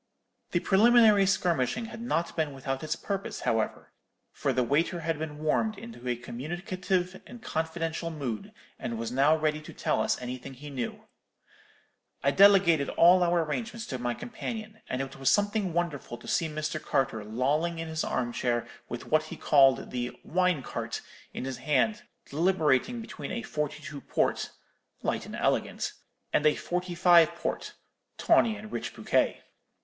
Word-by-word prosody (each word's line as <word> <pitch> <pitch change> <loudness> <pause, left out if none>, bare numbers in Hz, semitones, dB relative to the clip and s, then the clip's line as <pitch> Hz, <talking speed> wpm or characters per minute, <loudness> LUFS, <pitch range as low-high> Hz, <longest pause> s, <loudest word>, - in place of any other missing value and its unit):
The 175 - +1
preliminary 215 0 +6
skirmishing 180 - +1
had 225 0 -8
not 170 -8 -1
been 155 -3 -1
without 135 +1 -3
its 155 0 -1
purpose, 195 -1 -4
however; 110 -1 -1 0.4
for 140 - -1
the 125 -1 +2
waiter 165 +7 +1
had 160 -1 -1
been 155 -1 -5
warmed 175 +8 0
into 225 - -9
a 125 - +1
communicative 175 +9 -3
and 245 - -10
confidential 165 -3 -2
mood, 135 -9 -4 0.3
and 115 - -3
was 115 +1 -3
now 140 +5 +4
ready 155 0 0
to 155 - -11
tell - - 0
us - - +1
anything 125 +2 -6
he 145 +3 -9
knew. 125 -4 -4 1.2
"I 140 - +4
delegated 190 -6 +6
all 180 +2 +6
our 175 -1 +3
arrangements 225 +8 -4
to 130 - -3
my 120 0 -1
companion; 220 -2 -6
and 130 +1 -1
it 135 0 -9
was 135 -1 +2
something 205 0 +2
wonderful 160 -8 -2
to - - -14
see 165 - +1
Mr. 155 0 -3
Carter 115 -5 0
lolling 140 +10 0
in 165 0 -4
his 160 0 -2
arm 120 -1 -1
chair 120 -1 0 0.2
with 120 - -5
what 155 0 +2
he - - -8
called 135 -3 +4
the 125 -1 -4
'wine 180 -4 +1
cart' - - -4 0.3
in - - -5
his 130 -2 -4
hand, 155 +9 +1 0.2
deliberating 170 - +1
between 225 - -7
a 235 - -3
forty 150 -6 -3
two 145 -2 -7
port, - - 0 0.5
'light - - -1
and - - -7
elegant,' - - 0 0.4
and - - +3
a 150 - +4
forty 180 0 -3
five 170 -1 +6
port, 170 - -4 0.4
'tawny 225 -2 +4
and 215 +1 -10
rich - - -4
bouquet.' - - +1
160 Hz, 165 wpm, -29 LUFS, 135-185 Hz, 1.2 s, preliminary